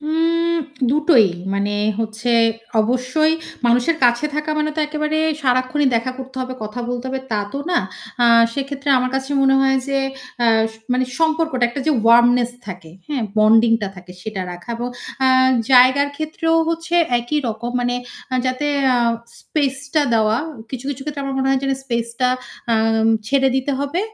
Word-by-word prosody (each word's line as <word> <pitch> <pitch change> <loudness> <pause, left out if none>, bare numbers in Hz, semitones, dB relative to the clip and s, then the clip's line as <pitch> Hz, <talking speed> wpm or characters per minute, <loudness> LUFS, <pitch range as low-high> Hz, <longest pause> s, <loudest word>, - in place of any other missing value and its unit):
উম 330 +2 0 0.3
দুটোই। 290 - +4 0.3
মানে 200 +1 -1 0.2
হচ্ছে 220 +2 -2 0.5
অবশ্যই 255 +7 +1 0.3
মানুষের 245 +7 +2
কাছে 240 +3 +3
থাকা 300 +1 -2
মানে 305 0 0
তো - - 0
একেবারে 305 +1 -2 0.2
সারাক্ষণই 255 +2 +1
দেখা 230 +3 -1
করতে 265 0 -9
হবে, 255 0 -4
কথা 215 +3 -5
বলতে 245 0 -4
হবে 265 0 -3
তা 215 - +1
তো 275 - -3
না। 350 - +3 0.4
আ - - +5 0.3
সেক্ষেত্রে 275 +1 -5
আমার 255 0 -1
কাছে 265 +1 -3
মনে 270 0 +4
হয় 270 0 +3
যে 275 0 +1 0.5
আ - - +4 0.3
স - - -16 0.2
মানে 255 +1 +1
সম্পর্কটা 320 -5 +1
একটা 240 +4 -5
যে 310 - +4
ওয়ার্মনেস 240 +1 +5 0.2
থাকে, 180 -4 -9 0.2
হ্যাঁ? 285 -5 -2 0.2
বন্ডিং 225 +2 +5
টা 200 - -1
থাকে 180 0 -12
সেটা 215 -2 -5
রাখা 175 +7 -8
ব - - -8 0.4
আ - - +4 0.4
জায়গার 260 +3 +6
ক্ষেত্রেও 320 +1 -1
হচ্ছে 330 +1 -3 0.2
একই 240 +6 -2
রকম। 225 +2 -4
মানে 245 0 0 0.4
আ - - +1
যাতে 255 +3 -1 0.3
আ - - +3 0.4
স্পেস 280 -4 -1 0.2
টা 305 - +4
দেওয়া 220 -1 +2 0.3
কিছু, 260 -1 -6
কিছু, 270 -1 -6
ক্ষেত্রে 290 -1 -5
আমার 275 -1 -3
মনে 265 0 0
হয় 270 -1 +2
যেন 270 - 0
স্পেস 235 -3 -2
টা 250 - +3 0.4
আ - - +4 0.5
ছেড়ে 270 +2 +2
দিতে 265 +2 -1
হবে। 285 +6 -1
260 Hz, 170 wpm, -19 LUFS, 240-300 Hz, 0.5 s, জায়গার